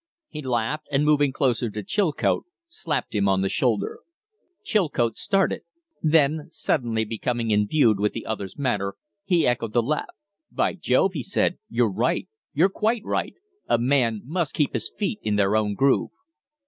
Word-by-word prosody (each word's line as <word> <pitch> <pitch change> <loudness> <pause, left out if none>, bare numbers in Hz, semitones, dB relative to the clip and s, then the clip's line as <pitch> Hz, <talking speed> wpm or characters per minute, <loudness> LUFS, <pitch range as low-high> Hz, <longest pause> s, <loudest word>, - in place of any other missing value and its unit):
He 150 - -6
laughed, 130 +3 -2
and, 145 +1 +2
moving 145 -2 +3
closer 125 -4 0
to 105 0 -6
Chilcote, 180 - 0 0.2
slapped 170 - -3
him 100 -2 +2
on 95 0 +2
the 95 - 0
shoulder. 115 -3 0 0.6
Chilcote 145 - +1
started; 195 -1 +1 0.4
then, 155 -1 +3
suddenly 115 -6 -1
becoming 115 +1 -2
imbued 105 +1 +3
with 105 +1 +1
the 115 - -6
other's 100 -3 -5
manner, 105 -8 -1 0.3
he 175 -4 +3
echoed 115 -3 0
the 120 - +3
laugh. 150 +5 -2 0.4
"By - - +1
Jove!" - - +2
he - - -3
said, - - 0
"you're - - +2
right! - - 0 0.2
You're 170 +7 +3
quite 220 +3 -1
right! - - -2 0.3
A - - +4
man 120 -3 +2
must 160 +1 -2
keep 150 -4 +1
his 115 - -2
feet 210 +1 -3
in 105 - 0
their 100 0 +2
own 105 -1 +1
groove." 135 +3 +2
125 Hz, 160 wpm, -24 LUFS, 110-150 Hz, 0.6 s, A